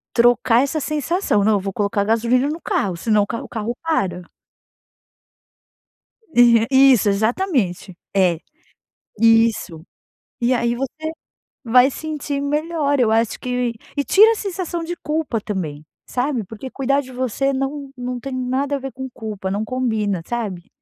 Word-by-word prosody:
Trocar 240 0 +4
essa 280 +3 -1
sensação, 305 - 0
não, 215 +1 +3
eu - - +1
vou 195 0 -4
colocar 200 0 0
gasolina 235 +4 +2
no 315 +3 -4
carro, 190 -3 -1
senão 210 +4 +2
o - - -5
carro 230 - -4
o - - -11
carro 225 +1 -3
para. 195 - 0 2.1
É, 235 -2 +5
isso, 265 -6 +6
exatamente, 215 - 0 0.2
é, 180 -4 +3 0.8
isso, 225 -7 +3 0.5
e 240 +2 +2
aí, 235 -1 +1
você 310 +5 -4 0.5
vai 250 +3 +5
sentir 295 -1 -4
melhor 295 0 0
eu 230 -3 +3
acho 225 0 +1
que 250 -1 -1 0.2
e 285 - 0
tira 430 +8 +6
a - - 0
sensação 365 -5 -4
de 345 +2 -4
culpa 305 -8 -2
também, 160 -8 -5 0.2
sabe, 250 -2 -1
porque 225 +6 -9
cuidar 275 +1 +1
de 260 -2 -11
você 260 +2 -1
não 270 +1 -3
não 250 0 -4
tem 270 +2 -6
nada 260 +3 -1
a - - -3
ver 270 -1 -6
com 265 0 -6
culpa, 210 -5 -5
não 205 +3 -1
combina, 220 -6 -1
sabe. 205 -7 -4
245 Hz, 155 wpm, -20 LUFS, 215-280 Hz, 2.1 s, isso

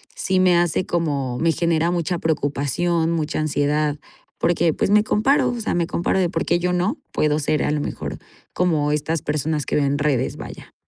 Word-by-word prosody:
sí 190 -1 0
me 180 -2 +4
hace 175 +1 +1
como 140 -7 -1
me 165 0 +3
genera 170 0 +1
mucha 175 0 -1
preocupación, 160 +2 0
mucha 155 -2 -1
ansiedad 150 0 0 0.4
porque 170 -1 +2
pues, - - -1
me 210 +1 +5
comparo, 245 +7 +2
o 240 - -4
sea, 220 - -1
me 170 -1 +1
comparo 175 +3 0
de: 180 -2 +2
"¿Por 165 -1 -2
qué 170 - +2
yo 180 +1 0
no, 180 - 0 0.2
puedo 150 0 +1
ser 150 0 0
a - - 0
lo 150 -1 0
mejor - - -5 0.4
como 155 -5 +1
estas 150 +1 -1
personas 150 0 -2
que - - -2
veo 140 -1 +2
redes?" 140 -4 0
Vaya. - - -10
165 Hz, 195 wpm, -22 LUFS, 150-175 Hz, 0.4 s, me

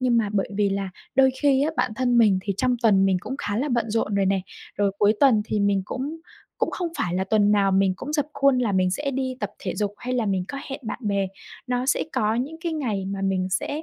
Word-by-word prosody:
nhưng 250 -2 +2
mà 220 -3 +2
bởi 195 -2 0
vì 205 -1 +2
là 195 -1 -2 0.2
đôi 265 0 +5
khi 275 -1 +4
á, 310 - +1
bản 245 -2 0
thân 245 -2 +2
mình 205 -5 +5
thì 200 - -1
trong 250 +2 +1
tuần 195 -4 +5
mình 190 -1 +3
cũng 265 - -5
khá 205 -4 -2
là 280 +5 0
bận 235 -3 0
rộn 210 -2 0
rồi 195 - +2
nè, 195 0 +2 0.4
rồi 200 -1 +1
cuối 210 +1 +4
tuần 240 -7 +5
thì 215 -2 -1
mình 200 -1 +2
cũng 290 +8 -5 0.4
cũng - - 0
không 355 -2 -3
phải 175 0 -1
là 190 +1 0
tuần 205 +1 +3
nào 200 -2 +3
mình 190 0 +3
cũng 295 +9 -6
rập 290 -2 +1
khuôn 275 -2 +3
là 230 -5 +1
mình 185 -1 +2
sẽ 280 +7 -2
đi 260 -1 -2
tập 210 - -2
thể - - -4
dục 205 -1 -1
hay 250 +1 -3
là 235 -3 0
mình 190 -2 0
có 275 - -5
hẹn 275 +2 -5
bạn 220 - -4
bè. 200 -2 0 0.4
Nó 250 +1 -1
sẽ - - +2
có 215 +1 +1
những 275 +7 -3
cái 335 -2 -2
ngày 225 -11 -2
mà 195 0 -4
mình 190 -1 0
sẽ, 285 - -2
215 Hz, 265 wpm, -24 LUFS, 195-260 Hz, 0.4 s, đôi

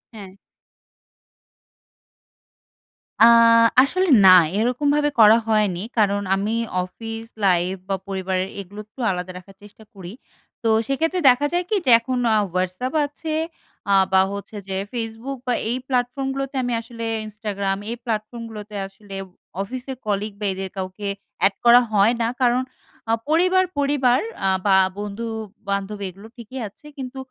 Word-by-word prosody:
হ্যাঁ। 200 -3 -9 2.9
আ - - +11 0.6
আসলে 370 +7 +1 0.2
না, - - +10 0.3
এরকমভাবে 285 +6 +1
করা 220 0 +8
হয়নি। 210 -5 +1 0.2
কারণ 205 -2 +2
আমি 200 +3 -2 0.3
অফিস 225 +4 -7 0.2
লাইফ 180 0 +2
বা, 195 - +1
পরিবারের 190 -1 -2
এগুলো 200 +2 -9
একটু 215 +5 -22
আলাদা 180 0 -4
রাখার 195 +2 -14
চেষ্টা 210 +1 -15
করি। 185 -3 -9 0.5
তো - - +1 0.2
সেক্ষেত্রে 325 +6 0
দেখা 255 +3 +3
যায় 350 +1 +1
কি? 435 - +1
যে - - +1
এখন 255 +2 -3 0.2
আ - - +4 0.2
Whatsapp 185 +8 -2
আছে, 310 +2 -6 0.6
আ - - +4 0.2
বা, 190 - +5
হচ্ছে 200 +2 -8
যে 190 - -4 0.2
Facebook 230 +3 -5
বা, 250 - +2 0.2
এই 245 - 0
প্ল্যাটফর্মগুলোতে 270 +2 -2
আমি 245 -1 -1
আসলে 230 0 -9 0.2
Instagram 205 -2 -3
এই 235 - -3
প্ল্যাটফর্মগুলোতে 215 -1 -5
আসলে 195 0 -12 0.5
অফিসের 255 +5 -6
কলিগ 210 0 -1
বা, 210 - -3
এদের 190 0 -5
কাউকে 190 +2 -5 0.4
এড 195 - +2
করা 240 +1 +8
হয় 210 +3 +4
না। - - +2 0.2
কারণ 250 0 +3 0.5
আ - - +3 0.2
পরিবার, 365 +4 +4
পরিবার 275 -3 +2 0.3
আ - - +3 0.2
বা, 195 -2 +5 0.2
বন্ধু-বান্ধব 210 -1 -5
এগুলো 195 +4 -13
ঠিকই 240 +3 -8
আছে। 205 - -19
কিন্তু 265 -1 -7
220 Hz, 140 wpm, -22 LUFS, 200-255 Hz, 2.9 s, আ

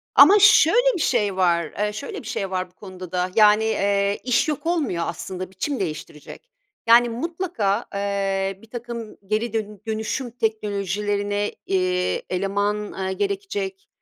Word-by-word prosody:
Ama 410 - +9
şöyle 435 - +6
bir 345 - -2
şey 210 -9 +1
var, 170 -4 +1
eee, 210 0 0
şöyle 280 - -6
bir 225 - -11
şey 200 -5 -3
var 185 -1 -2
bu - - -32
konuda 185 -3 -10
da, 180 0 -1
yani, 210 0 +6 0.2
ııı, 200 0 +1
iş 250 +5 +2
yok 300 -1 -3
olmuyor 285 - 0
aslında 185 +2 -5
biçim 275 +8 -3
değiştirecek. 155 - -7 0.4
Yani, 235 +1 +6
mutlaka, 240 - -2
ııı, 195 -1 -1
birtakım 235 -1 -7
geri 220 +3 -1
dön 210 -2 -4
dönüşüm 220 +3 -3
teknolojilerine, 205 -2 -1
eee, 185 -1 0
eleman, 200 +2 0
ııı, 195 -2 -4
gerekecek, 390 - -3
210 Hz, 140 wpm, -23 LUFS, 195-245 Hz, 0.4 s, Ama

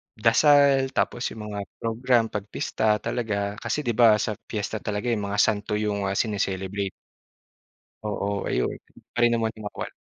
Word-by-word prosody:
dasal. 135 +3 +4
Tapos 120 - 0
'yung 110 - -7
mga 100 - -4 0.2
program 120 +1 +2
'pag 105 -2 -3
pista 110 -1 +1
talaga. 105 -4 -2
Kasi, 150 - -2
'di 120 - 0
ba, 115 -1 +6
sa 105 - -1 0.2
piyesta 110 0 -3
talaga, 105 +4 -2
eh, - - +3
'yung 105 -3 -2
mga 100 +1 -2
santo 105 -1 0
'yong, 105 -2 -1
ah, 95 - -1
sine-celebrate. 100 -2 -1 1.1
Oo. 100 -1 -2
Ayun - - 0 0.4
pa 120 - 0
rin 120 - +6
naman 115 -1 0
yung 105 -2 -6
makwan. - - -6
110 Hz, 165 wpm, -25 LUFS, 100-120 Hz, 1.1 s, ba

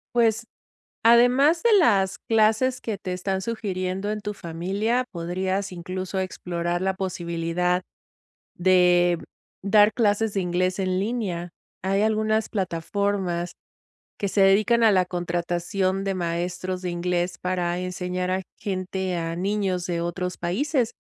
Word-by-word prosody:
Pues, 230 -1 +2 0.6
además 250 +8 +5
de 470 - +4
las 195 - +3
clases 225 +3 +2
que 215 -3 -3
te 185 -1 -4
están 190 +1 -2
sugiriendo 195 -2 -3
en 215 0 -3
tu 210 0 -4
familia, 200 +9 -1
podrías 185 +3 -2
incluso 185 +2 -4
explorar 175 -1 -3
la 190 0 +1
posibilidad 180 -1 -1 0.7
de, 175 -1 +4
mm, - - -12 0.4
dar 205 +1 +5
clases 215 -1 +1
de 195 - +1
inglés 180 +1 0
en 185 -1 0
línea. 195 -5 -2 0.3
Hay 195 +2 +1
algunas 220 0 +1
plataformas 185 -1 -2 0.7
que 200 - -1
se 195 +1 +2
dedican 215 +5 +4
a 220 -2 +6
la 185 -2 +3
contratación 175 +2 -1
de 195 -1 -1
maestros 180 +2 -3
de 180 - -2
inglés 175 0 -1
para 180 -1 -1
enseñar 180 0 -3
a 190 +1 0 0.2
gente, 185 -1 -3
a 165 0 -3
niños 190 -1 -1
de 170 -2 -2
otros 180 +1 -3
países, 235 - 0
185 Hz, 135 wpm, -24 LUFS, 180-210 Hz, 0.7 s, a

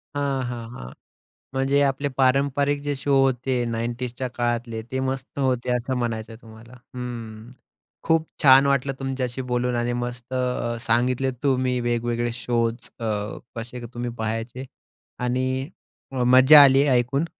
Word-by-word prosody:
हां, 140 -2 -1
हां, 120 -2 -6
हां, 60 - -9 0.6
म्हणजे 135 +2 +2
आपले 140 0 +1
पारंपरिक 140 +2 +2
जे 145 - +1
शो 140 +1 -1
होते 130 0 +1
90sच्या 120 +2 -3
काळातले, 120 -2 -2
ते 130 - -1
मस्त 130 +1 -4
होते 130 -3 0
असं 125 +2 -2
म्हणायचं 115 -2 -3
आहे 110 - -14
तुम्हाला. 110 +1 -14 0.2
हम्म, 115 -2 -7 0.5
खूप 160 -1 +2 0.2
छान 135 0 +8
वाटलं 140 -1 +1
तुमच्याशी 130 -1 -3
बोलून. 125 0 0
आणि 120 0 0
मस्त 120 +1 -5
अ, 125 -2 -1
सांगितले 125 +3 +1
तुम्ही 130 -2 +1
वेगवेगळे 120 0 -1
शोज 115 -1 0 0.3
अ, 115 - -4 0.5
कसे 120 +2 -7
तुम्ही 120 0 -3
पहायचे. 115 +3 -4 0.5
आणि 130 +2 -1 0.6
मज्जा 130 +4 +8
आली 135 0 +6
ऐकून. 125 +4 +2
125 Hz, 135 wpm, -24 LUFS, 120-135 Hz, 0.6 s, छान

